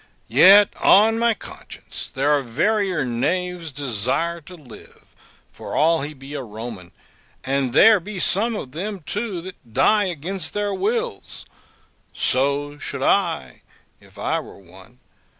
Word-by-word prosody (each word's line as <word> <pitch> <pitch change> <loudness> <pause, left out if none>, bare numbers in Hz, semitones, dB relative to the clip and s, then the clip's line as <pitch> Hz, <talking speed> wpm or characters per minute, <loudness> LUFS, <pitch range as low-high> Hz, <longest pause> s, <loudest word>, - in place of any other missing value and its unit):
Yet, 200 +2 +7
on 220 +3 +5
my 235 -1 +2
conscience, - - -10
there 140 +3 0
are 145 - 0
verier 180 - 0
knaves 170 +7 -2
desire 140 +6 -2
to 180 +4 -12
live, 140 -9 -15 0.5
for - - -8
all 160 +1 +3
he 150 +2 -6
be 135 +2 -11
a 145 - -4
Roman; 110 -5 -9 0.5
and 135 -1 -1
there 215 - +6
be 200 +3 -8
some 220 +6 +2
of 135 -11 -6
them 195 +6 -5
too 205 +2 -4
that 165 -11 -13
die 205 +10 +4
against 180 +2 -4
their 205 -1 -1
wills; 460 - -3 0.7
so 140 +2 0
should - - -3
I, 65 -2 0 0.4
if - - -20
I - - -1
were - - -11
one. 95 +5 -17
160 Hz, 140 wpm, -21 LUFS, 130-200 Hz, 0.7 s, Yet